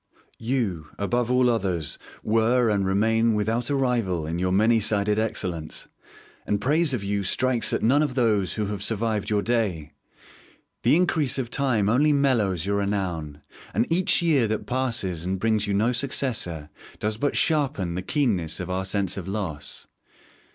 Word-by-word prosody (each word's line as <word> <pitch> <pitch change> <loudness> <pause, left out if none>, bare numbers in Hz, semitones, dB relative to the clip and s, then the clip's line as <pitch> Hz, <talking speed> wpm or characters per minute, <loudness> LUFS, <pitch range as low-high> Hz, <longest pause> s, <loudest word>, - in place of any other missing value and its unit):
You, 110 - -2
above 120 +4 -1
all 125 0 +3
others, 90 -10 -1 0.2
were 115 +2 +2
and 100 -2 +1
remain 110 +3 +2
without 115 +4 -1
a 145 - +1
rival 115 - 0
in 80 +2 -3
your 90 0 0
many 110 +4 +4
sided 105 0 0
excellence, 90 -7 -3 0.5
and 105 - -1
praise 150 +7 +2
of 120 -6 -2
you 100 0 -1
strikes 125 +5 +1
at - - -1
none 135 +6 +4
of 145 -4 -1
those 105 -8 +1
who 105 - -1
have 100 -1 -4
survived 110 -1 -1
your 105 -1 +1
day. 100 -11 -1 0.9
The 120 - +4
increase 160 -6 +2
of 125 -3 -3
time 125 -8 +1
only 145 +7 +3
mellows 115 - +1
your 100 0 0
renown, 90 -7 -3 0.3
and - - +2
each 185 0 +2
year 145 -9 +3
that 110 0 -2
passes 115 -10 -2
and 95 +2 -2
brings 110 -1 +1
you 100 - 0
no 110 +5 +2
successor 115 - -1 0.3
does 105 0 -2
but 140 +4 0
sharpen 135 - +1
the 90 - -3
keenness 95 - -1
of 90 0 -4
our 95 +1 -2
sense 95 -1 0
of 95 -2 -6
loss. 90 -8 -4
110 Hz, 165 wpm, -25 LUFS, 95-125 Hz, 0.9 s, many